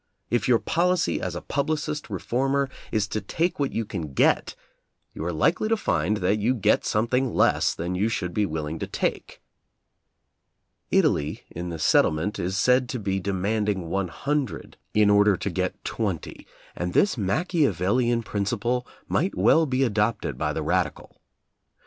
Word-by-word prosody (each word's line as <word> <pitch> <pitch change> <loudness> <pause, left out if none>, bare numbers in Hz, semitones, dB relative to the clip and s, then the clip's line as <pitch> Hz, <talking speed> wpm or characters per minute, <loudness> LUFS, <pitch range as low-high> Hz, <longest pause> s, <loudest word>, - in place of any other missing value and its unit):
If 120 - +1
your 125 -2 +5
policy 175 +6 +1
as 90 -2 -3
a 90 - -6
publicist 150 +1 -2
reformer 135 +2 0 0.2
is 105 -3 +1
to 110 - -2
take 165 - -1
what 140 -2 0
you 115 - -2
can 85 -9 -5
get, - - +2 0.6
you - - -6
are 85 - -1
likely 165 - +1
to 225 - +2
find 105 - 0
that 100 +3 +2
you 120 +5 +1
get 105 -2 +2
something 120 +3 0
less - - +3
than 85 +2 -3
you 100 +5 +1
should 90 -5 -3
be 105 +2 +1
willing 80 0 -4
to - - -3
take. - - -3 1.5
Italy 75 +1 +1
in 85 +1 -5
the 85 - -5
settlement 80 +5 +2
is 95 +3 -2
said 125 +3 +3
to 125 - -3
be 95 -2 -1
de 100 +2 -2
manding 100 -2 -1
one 95 -1 0
hundred 140 - -3 0.2
in 105 -1 +5
order 105 -1 +5
to - - -3
get - - -3
twenty, - - -4 0.3
and 90 0 -3
this 200 - +3
Machiavellian 120 - +1
principle 120 +5 -1 0.2
might 185 +6 0
well 160 -1 +4
be 130 0 +1
adopted 105 -2 0
by - - -1
the - - -3
radical. - - -2
110 Hz, 160 wpm, -25 LUFS, 95-130 Hz, 1.5 s, your